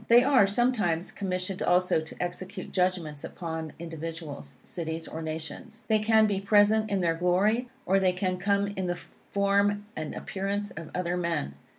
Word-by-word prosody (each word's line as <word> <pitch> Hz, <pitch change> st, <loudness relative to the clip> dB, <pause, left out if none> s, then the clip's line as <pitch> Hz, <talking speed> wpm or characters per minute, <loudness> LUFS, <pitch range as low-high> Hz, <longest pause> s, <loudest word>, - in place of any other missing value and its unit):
They 240 Hz, +1 st, +7 dB
are, 260 Hz, -7 st, +5 dB
sometimes, 200 Hz, -6 st, +1 dB
commissioned 185 Hz, -1 st, -3 dB
also 180 Hz, -2 st, +3 dB
to 160 Hz, -, -7 dB
execute 185 Hz, +2 st, -4 dB
judgments 180 Hz, -6 st, 0 dB
upon 160 Hz, -2 st, -5 dB
individuals, 160 Hz, -4 st, -7 dB
cities 165 Hz, -1 st, -4 dB
or 160 Hz, -, -6 dB
nations. 160 Hz, +8 st, -6 dB
They 215 Hz, -1 st, +4 dB
can 220 Hz, 0 st, +5 dB
be 200 Hz, -2 st, 0 dB
present 210 Hz, +2 st, +4 dB
in 200 Hz, -2 st, +1 dB
their 170 Hz, -2 st, +2 dB
glory, 195 Hz, +8 st, +2 dB, 0.2 s
or, 195 Hz, +1 st, +4 dB
they 185 Hz, -1 st, +3 dB
can 185 Hz, 0 st, -1 dB
come 200 Hz, +1 st, +2 dB
in 190 Hz, -2 st, -3 dB
the 175 Hz, -, 0 dB, 0.3 s
form 200 Hz, +1 st, +2 dB
and 155 Hz, -1 st, -4 dB
appearance 200 Hz, +1 st, -3 dB
of 160 Hz, -1 st, -8 dB
other 180 Hz, -1 st, 0 dB
men. 165 Hz, -, -1 dB
185 Hz, 165 wpm, -28 LUFS, 165-205 Hz, 0.3 s, They